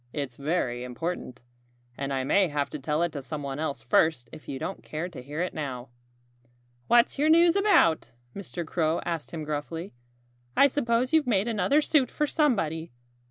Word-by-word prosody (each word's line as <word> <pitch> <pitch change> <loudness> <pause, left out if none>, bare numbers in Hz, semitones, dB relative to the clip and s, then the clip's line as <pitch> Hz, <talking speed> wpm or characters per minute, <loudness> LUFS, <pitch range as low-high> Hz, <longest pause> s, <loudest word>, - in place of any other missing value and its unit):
"It's 140 -5 -4
very 140 -5 -1
important. 125 -1 -5 0.5
And 140 +1 -4
I 135 -1 0
may 190 +8 +3
have 145 -2 -2
to 150 - -5
tell 150 +4 0
it 175 - 0
to 145 - -5
someone 140 0 -5
else 140 -7 -3
first 120 0 +2
if 155 - -11
you 135 - -3
don't 190 +8 -5
care 155 +3 -4
to 175 -7 -9
hear 145 +6 -3
it 180 - -4
now." 130 -5 -5 1.0
"What's 240 +3 +4
your 300 +2 +3
news 335 +1 +6
about?" 390 - +4 0.3
Mr. 180 -3 -5
Crow 160 0 0
asked 165 -3 -3
him 160 -2 -5
gruffly. 155 +3 -4 0.6
"I - - +8
suppose 255 -2 +1
you've 315 -4 +4
made 210 -2 +2
another 240 +7 +2
suit 290 -3 +2
for 300 - 0
somebody. 170 - 0
160 Hz, 175 wpm, -27 LUFS, 140-230 Hz, 1.0 s, I